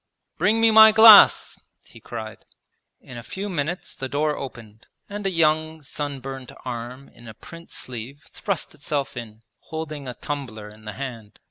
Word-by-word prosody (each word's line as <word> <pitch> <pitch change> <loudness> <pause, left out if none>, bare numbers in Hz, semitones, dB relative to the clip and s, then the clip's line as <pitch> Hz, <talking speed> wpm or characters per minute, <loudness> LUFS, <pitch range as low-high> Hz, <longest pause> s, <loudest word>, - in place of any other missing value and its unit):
'Bring 210 +6 +2
me 225 0 +5
my 220 0 +9
glass!' 220 -1 +8 0.3
he - - -16
cried. 110 -2 -8 0.6
In 125 -2 -10
a - - -8
few 190 - -6
minutes 170 0 -4
the 135 - -6
door 150 +2 0
opened 115 -4 -10 0.2
and 205 -1 -5
a - - -1
young 160 -1 0
sunburnt 135 -3 -6
arm 125 +2 -7
in 120 - -16
a 110 - -10
print 170 +8 -13
sleeve 130 +4 -8
thrust 200 -5 -4
itself 140 -1 -4
in, 115 -2 -9 0.2
holding 155 -3 -7
a 125 - -6
tumbler 120 -8 -6
in 110 +1 -17
the 105 - -6
hand. 115 -4 -8
140 Hz, 160 wpm, -23 LUFS, 120-160 Hz, 0.6 s, my